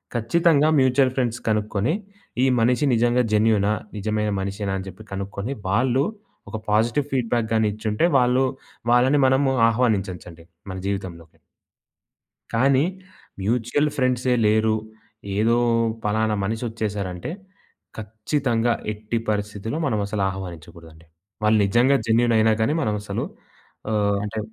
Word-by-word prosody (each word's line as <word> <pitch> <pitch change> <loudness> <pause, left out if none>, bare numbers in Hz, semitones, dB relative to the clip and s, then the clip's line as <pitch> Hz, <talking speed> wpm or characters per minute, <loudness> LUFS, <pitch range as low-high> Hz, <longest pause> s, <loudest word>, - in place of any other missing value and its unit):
ఖచ్చితంగా 150 +6 +3
mutual 130 0 +3
funds 120 -2 0
కనుక్కొని, 105 +4 0 0.5
ఈ - - +5
మనిషి 125 +4 +2
నిజంగా 120 +2 +2
జెన్యూనా, 105 -1 +3 0.2
నిజమైన 105 +1 -1
మనిషేనా, 100 0 -3
అని 95 - -8
చెప్పి 95 +4 -13
కనుక్కొని, 100 +5 -4 0.2
వాళ్ళు 125 +6 +2 0.5
ఒక 110 - -4
పాజిటివ్ 115 +7 +1
ఫీడ్‌బ్యాక్ 120 -3 0
గాని 110 -1 +3
ఇచ్చుంటే, 110 +7 0
వాళ్ళు 125 +1 +3 0.5
వాళ్ళని 130 +4 +4
మనము 135 +1 +3 0.2
ఆహ్వానించొచ్చండి 95 -8 -2 0.3
మన 95 - -6
జీవితంలోకి. 90 -5 -5 1.2
కానీ 135 +4 +3 0.6
మ్యూచువల్ 120 +7 +1
ఫ్రేండ్సే 125 -2 +1
లేరు, 110 +1 +3 0.6
ఏదో 115 +3 +3 0.5
పలానా 110 +1 +1
మనిషి 110 +4 -3
వచ్చేసారంటే, 100 - -4 0.7
ఖచ్చితంగా 115 +2 -1 0.2
ఎట్టి 110 +2 -3
పరిస్థితిలో 105 +4 -3
మనం 110 -6 0
అసలు 100 0 -2
ఆహ్వానించకూడదండి. 85 -3 -10 0.4
వాళ్ళు 110 0 +4
నిజంగా 120 +7 +3
జెన్యూనైనా 115 -1 +3
గాని 125 +7 +2
మనం 105 -4 0
అసలు - - -3 0.7
ఆహ్, 100 -2 +1
అంటే, 105 +1 -5
110 Hz, 115 wpm, -23 LUFS, 105-125 Hz, 1.2 s, ఈ